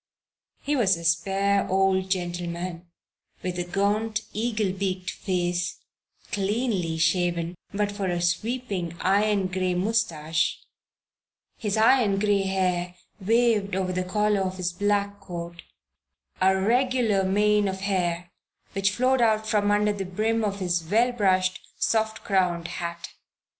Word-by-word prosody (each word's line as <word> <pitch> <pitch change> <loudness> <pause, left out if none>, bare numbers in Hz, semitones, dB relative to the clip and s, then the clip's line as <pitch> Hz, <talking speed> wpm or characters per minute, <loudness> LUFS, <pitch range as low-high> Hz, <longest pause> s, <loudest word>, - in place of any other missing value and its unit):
He 295 - 0
was 195 -9 +3
a 170 - -9
spare 195 +4 +1
old 190 0 +2
gentleman, 175 -1 -3 0.6
with 180 -1 -3
a - - 0
gaunt, 205 +4 0
eagle 215 -3 0
beaked 190 -1 -2
face, 175 -1 -2 0.5
cleanly 200 -5 -1
shaven 170 0 +1 0.2
but 205 0 -1
for 200 -2 -3
a 175 -1 -1
sweeping 180 -1 -2
iron 200 +1 +2
gray 185 0 -1
mustache, 175 -6 0 1.0
his 210 -1 -1
iron 220 -3 +4
gray 205 -1 +2
hair 180 -2 0 0.2
waved 215 -1 +2
over 185 -1 -1
the 185 0 -1
collar 210 +2 +1
of 185 -1 -2
his 180 -1 -2
black 205 +1 0
coat 170 -1 -7 0.8
a 190 +1 +4
regular 235 -1 +2
mane 210 +2 +3
of 190 0 -4
hair 175 -3 -1 0.4
which 195 0 +2
flowed 255 +5 +2
out 220 -2 +3
from 205 -2 +2
under 210 0 +2
the 200 -1 -4
brim 220 +5 -1
of 200 -2 -1
his 175 -2 0
well 225 +9 +2
brushed, 185 -5 +1 0.2
soft 220 -1 0
crowned 180 -4 +1
hat. 170 0 -5
195 Hz, 130 wpm, -25 LUFS, 180-210 Hz, 1.0 s, iron